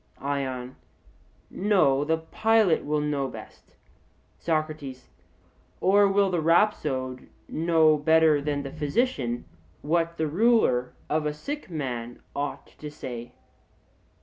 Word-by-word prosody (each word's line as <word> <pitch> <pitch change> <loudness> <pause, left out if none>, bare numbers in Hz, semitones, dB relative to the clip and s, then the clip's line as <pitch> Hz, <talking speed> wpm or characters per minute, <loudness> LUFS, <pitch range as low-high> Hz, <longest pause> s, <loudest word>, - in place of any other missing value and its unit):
ION: 130 -3 -3 0.7
No; 180 -9 +2
the 160 +2 +1
pilot 210 +2 +2
will 150 0 0
know 145 -2 -1
best. - - -12 0.6
SOCRATES: 155 -5 -3 0.7
Or 200 +2 +5
will 195 -1 +2
the 175 -2 0
rhapsode 150 -7 +1 0.2
know 160 -1 +3
better 160 0 +4
than 145 -1 -2
the 135 - -6
physician 150 - -1 0.4
what 170 +2 0
the 160 - 0
ruler 160 - +2
of 155 0 0
a 150 - -2
sick 290 - -6
man 120 -7 -4 0.2
ought 140 -1 -3
to 150 - -6
say? 125 -5 -8
150 Hz, 115 wpm, -26 LUFS, 135-170 Hz, 0.7 s, Or